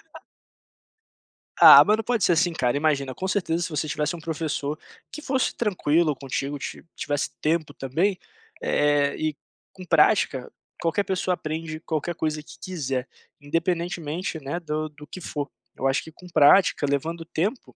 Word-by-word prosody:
A - - -9 1.4
Ah, - - +11
não 210 +1 +3
pode 235 -4 0
ser - - +4
assim, 170 +1 +2
cara, 125 -4 0
imagina, 140 -3 0
com 190 - -3
certeza, 175 -4 0
se - - -3
você 155 -1 -2
tivesse 150 +3 -1
um - - -8
professor 155 -2 -3 0.3
que 305 - -7
fosse 265 -3 0
tranquilo 170 - +1
contigo, 140 +1 -4
ti - - -7
tivesse 145 -1 -2
tempo 155 -2 0
também, 170 +9 0 0.4
eh, 145 -1 +2
e 155 -1 -1 0.4
com 185 - -10
prática, 155 -6 +3 0.3
qualquer 170 +4 +1
pessoa 185 -1 -1
aprende 155 -1 -5
qualquer 165 +1 -3
coisa 155 -1 -2
que - - -14
quiser, 135 -8 -3 0.3
independentemente, 165 +1 -2
né, 145 +4 -4
do 155 -1 -3
do 150 0 -14
que - - -9
for, 145 -2 -4 0.3
eu 135 - -1
acho 135 - +1
que 160 - -11
com 180 +3 -15
prática, 160 0 +5
levando 165 +4 -2
tempo 195 +9 -3
160 Hz, 160 wpm, -25 LUFS, 145-175 Hz, 1.4 s, Ah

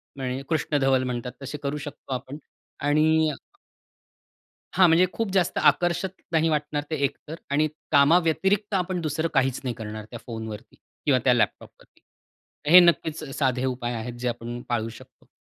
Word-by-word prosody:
म्हणजे 130 -1 -3
कृष्णधवल 140 -4 +1
म्हणतात 125 -1 -3
तसे 135 +2 -5
करू 140 +1 -2
शकतो 145 -2 -7
आपण. 130 +2 -5 0.4
आणि 155 +2 +3 1.4
हां, 185 - +6
म्हणजे 170 +2 +5
खूप 225 -4 -2
जास्त 185 -3 +1
आकर्षक 175 +2 +2 0.2
नाही 165 0 +2
वाटणार 150 -1 -1
ते - - +1
एकतर. 150 +3 -6
आणि 150 +2 +2 0.2
कामाव्यतिरिक्त 175 +7 +3
आपण 180 -1 0
2रं 155 +1 -1
काहीचं 135 -2 +2
नाही 125 -2 -2
करणार 110 -1 -7
त्या 120 - -7
फोनवरती 110 -2 -7 0.3
किंवा 135 -4 +4
त्या 125 - +5
लॅपटॉपवरती. 120 - -3 0.7
हे 180 - +11
नक्कीचं 160 -4 +2
साधे 130 -2 0
उपाय 125 -2 -2
आहेत, 120 +1 -5
जे 125 - -2
आपण 120 0 -5
पाळू 115 -2 -1
शकतो. 115 - -15
145 Hz, 150 wpm, -25 LUFS, 125-160 Hz, 1.4 s, हे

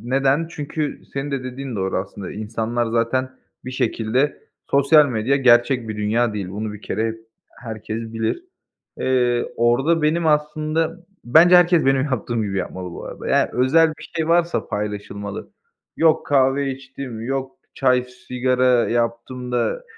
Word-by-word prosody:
Neden? 135 +6 +1
Çünkü 150 -1 -4
senin 140 +1 -3
de 135 -2 -3
dediğin 130 -1 -6
doğru 95 -1 -1
aslında. 95 0 -6
İnsanlar 115 +2 -2
zaten 120 +3 0 0.3
bir 125 - -5
şekilde 130 +2 -1 0.3
Sosyal 145 +2 +5
medya 125 +2 +1
gerçek 120 -2 +3
bir 110 - -4
dünya 110 +2 0
değil, 100 -3 -4
bunu 105 +3 -4
bir 105 - -10
kere 110 0 -2 0.3
herkes 110 -1 -7
bilir. 115 - -2 0.5
Eee, 125 -2 +1
orada 135 +8 +2
benim 160 +2 +1
aslında 155 +3 0 0.2
Bence 165 +8 +7
herkes 175 -3 +4
benim 135 -1 +3
yaptığım 120 -4 -2
gibi 100 -2 -3
yapmalı 90 0 -5
bu - - -8
arada. - - -7
Yani, - - +3
özel 145 +6 +4
bir - - -10
şey 160 -1 -1
varsa 170 0 +1
paylaşılmalı. 100 -1 -5 0.5
Yok, 160 -1 +3
"Kahve 135 0 +2
içtim.", 130 -3 -8
yok, 135 +2 -3 0.2
"Çay, 125 -2 +2
sigara 125 0 +1
yaptım." 120 +1 -2
da, 125 - -1
125 Hz, 145 wpm, -21 LUFS, 115-140 Hz, 0.5 s, Bence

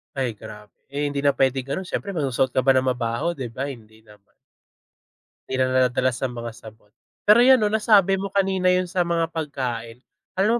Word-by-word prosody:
Ay 130 -4 -1
grabe. 105 0 -11 0.2
Eh, 145 0 -1
hindi 140 0 -3
na 140 - +4
pwedeng 130 -1 0
ganun 160 +7 -4
siyempre 200 -1 -4
magsusuot 135 -5 0
ka 130 - +2
ba 135 - +1
ng 130 - +1
mabaho, 125 +5 -1
'di 130 -7 -6
ba, 130 +4 -4
hindi 110 -5 -11
naman. 105 -2 -21 1.1
Hindi 130 - -3
na 130 - +3
nadadala 130 0 +2
sa 125 - -3
mga 120 -1 -6
sabon. 110 -2 -15 0.4
Pero 210 +3 +7
'yon, 260 0 +6
no, 210 - +2
nasabi 210 -3 +3
mo 195 0 -4
kanina 190 -2 +2
yun 180 0 +1
sa 180 0 0
mga 170 -1 0
pagkain. 125 -7 -4 0.4
Alam 225 +5 +3
135 Hz, 195 wpm, -23 LUFS, 120-185 Hz, 1.1 s, Pero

